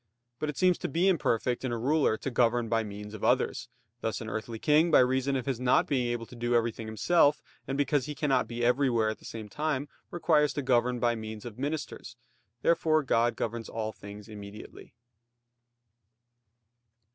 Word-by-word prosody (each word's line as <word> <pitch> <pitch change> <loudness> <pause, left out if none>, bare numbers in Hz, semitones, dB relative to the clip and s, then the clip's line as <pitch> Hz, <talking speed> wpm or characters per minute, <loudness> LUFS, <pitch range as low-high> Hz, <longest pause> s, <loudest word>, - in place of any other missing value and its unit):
But 155 - -2
it 150 - -5
seems 180 -1 +3
to - - -2
be 175 +4 +1
imperfect 125 - +1
in 130 - -2
a 120 - -1
ruler 135 -1 +2
to 135 - -4
govern 120 -1 +2
by 115 0 +1
means 105 0 -8
of 110 - -8
others; - - +1 0.3
thus 110 -4 -2
an 110 - -6
earthly 110 +1 -4
king, 155 +7 +3
by 155 - +6
reason 130 +2 +2
of 130 - -2
his 135 -4 -2
not 125 0 +3
being 130 -4 0
able 120 -1 -2
to 125 - -13
do 120 0 0
everything 115 -1 0
himself, 145 - +3 0.3
and 135 - -2
because 145 -1 +1
he 150 - -5
cannot 135 -3 +1
be 120 0 -2
everywhere 120 -3 +2
at 110 - -5
the - - -16
same 110 -2 -7
time, 145 +3 -2 0.2
requires 155 -4 +2
to 145 - -3
govern 125 -1 +2
by 120 0 +2
means 110 -1 -7
of 120 0 -8
ministers. 145 -4 -4 0.5
Therefore 155 -2 +3
God 120 -2 +2
governs 115 0 -4
all 110 -1 -3
things 100 0 -11
immediately. 105 0 -11
120 Hz, 185 wpm, -29 LUFS, 115-145 Hz, 0.5 s, by